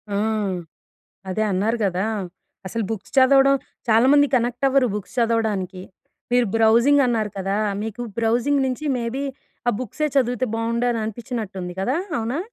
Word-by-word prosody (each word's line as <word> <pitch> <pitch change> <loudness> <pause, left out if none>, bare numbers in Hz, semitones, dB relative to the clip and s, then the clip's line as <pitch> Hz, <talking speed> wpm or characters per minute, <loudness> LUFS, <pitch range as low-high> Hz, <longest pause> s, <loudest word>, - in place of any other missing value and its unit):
ఆ! - - +1 1.1
అదే 215 +4 -1
అన్నారు 210 +5 +1
కదా! 185 +1 0 0.6
అసలు 220 +3 -2
బుక్స్ 210 -4 -6
చదవడం 270 +1 +6 0.3
చాలామంది 265 +6 +5
కనెక్ట్ 245 +2 0
అవ్వరు. 270 -1 +3
బుక్స్ 210 +2 -6
చదవడానికి. 215 -6 0 0.5
మీరు 245 -1 +4
బ్రౌజింగ్ 235 +6 +5
అన్నారు 220 -3 0
కదా! 195 +1 -1 0.3
మీకు 225 +2 -5 0.2
బ్రౌజింగ్ 240 +5 +2
నుంచి 260 +4 -3
మేబీ 240 +4 -3 0.4
ఆ - - +6
బుక్సే 255 +5 -2
చదివితే 250 -1 +2
బాగుండు 235 +1 0
అని 230 - -1
అనిపించినట్టుంది 210 -5 -5
కదా? 255 +8 0 0.2
అవునా? 230 +5 -2
230 Hz, 135 wpm, -22 LUFS, 215-255 Hz, 1.1 s, చదవడం